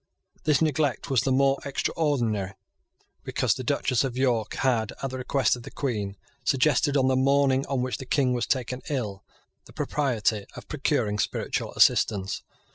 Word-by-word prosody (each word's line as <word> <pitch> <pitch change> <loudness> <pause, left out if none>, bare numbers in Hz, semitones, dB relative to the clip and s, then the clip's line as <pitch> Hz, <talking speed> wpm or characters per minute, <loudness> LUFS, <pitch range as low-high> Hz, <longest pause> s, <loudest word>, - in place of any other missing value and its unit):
This 150 0 +3
neglect 145 -4 0
was 130 -4 +4
the 135 - 0
more 135 +1 +3
extraordinary 120 -9 -1 0.7
because - - +1
the - - -6
Duchess 125 0 +1
of 130 -2 -3
York 120 -5 +1
had, 115 -5 +1
at 135 - -2
the 130 - -5
request 130 +1 +1
of 120 - -9
the - - -9
Queen, 105 -7 -3 0.3
suggested, 145 +1 +2
on 130 -1 +3
the 130 - +3
morning 135 0 +3
on 135 -3 0
which 130 - -3
the 130 - -8
King 130 -2 +2
was 120 - -1
taken 125 0 -1
ill, 105 -9 -3 0.4
the - - -16
propriety 115 -7 0
of - - -10
procuring 105 0 0
spiritual - - -2
assistance. 100 -1 +3
130 Hz, 165 wpm, -26 LUFS, 115-140 Hz, 0.7 s, was